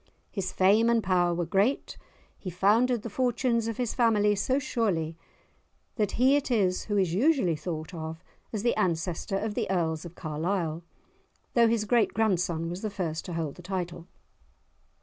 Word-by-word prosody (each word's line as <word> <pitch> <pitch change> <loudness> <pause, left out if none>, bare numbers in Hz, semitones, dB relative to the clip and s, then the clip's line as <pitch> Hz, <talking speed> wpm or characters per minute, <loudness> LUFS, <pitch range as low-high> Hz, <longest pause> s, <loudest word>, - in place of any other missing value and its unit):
His 195 -3 -3
fame 210 +5 +4
and 230 -2 +2
power 175 -1 +2
were 170 0 -1
great. 195 - 0 0.4
He 185 - -5
founded 215 +6 +2
the 230 - -4
fortunes 240 -1 +1
of 230 - -3
his 245 -3 -1
family 215 -4 +3
so 230 +6 0
surely 190 - -1 0.8
that 210 -4 0
he 260 +4 +4
it 290 -2 0
is 195 -7 +1
who 205 -1 -1
is 185 -4 +1
usually 225 - +3
thought 160 +1 -5
of 160 -1 -6 0.3
as 215 -2 -3
the 235 - +3
ancestor 175 +2 -1
of 215 +1 -2
the - - -2
Earls 160 -4 0
of 175 -1 -10
Carlisle, 165 +1 -2 0.7
though 235 -1 +5
his 225 -2 +1
great 230 -1 +2
grandson 180 -6 +1
was 175 +3 -5
the 215 - -2
first 175 -6 -3
to 175 - -5
hold 160 -4 -3
the - - -10
title. 175 -2 -4
195 Hz, 170 wpm, -28 LUFS, 170-225 Hz, 0.8 s, though